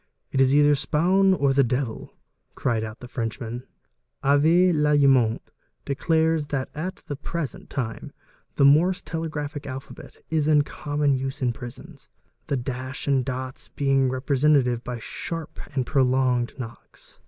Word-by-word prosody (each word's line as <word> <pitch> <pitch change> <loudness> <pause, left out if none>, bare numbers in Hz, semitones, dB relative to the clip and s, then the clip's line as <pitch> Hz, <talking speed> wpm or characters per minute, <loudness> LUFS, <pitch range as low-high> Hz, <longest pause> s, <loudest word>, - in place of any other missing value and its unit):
"It 135 - +2
is 135 +1 +4
either 145 0 +6
Spaun 180 +7 +3
'or 140 -5 +2
the 140 0 +4
Devil,' 125 -1 -2 0.4
cried 115 -4 0
out 110 0 -7
the 125 - -8
Frenchman. 120 +1 -5 0.6
<Avé 160 +6 +4
Lallemant 140 -6 +3 0.3
declares 160 +2 +1
that 135 -3 -3
t 180 +5 -5
the 145 - -4
present 155 +1 -5
time 115 -4 -4 0.4
the 140 - +4
Morse 170 +6 +4
telegraphic 155 -3 -4
alphabet 130 0 -9
1s 155 -2 +1
in 150 -2 +5
common 145 0 -1
use 135 +1 -3
in 120 -2 +1
risons, 135 +5 -10 0.4
the 140 - 0
dash 130 +2 -5
and 135 -2 +3
dots 130 0 -5
being 135 -2 +2
represented 130 -2 +2
by 125 -1 -4
sharp 165 +7 -6 0.2
and 130 -2 +1
prolonged 130 -3 +1
mocks. 115 - -10
140 Hz, 140 wpm, -25 LUFS, 125-150 Hz, 0.6 s, either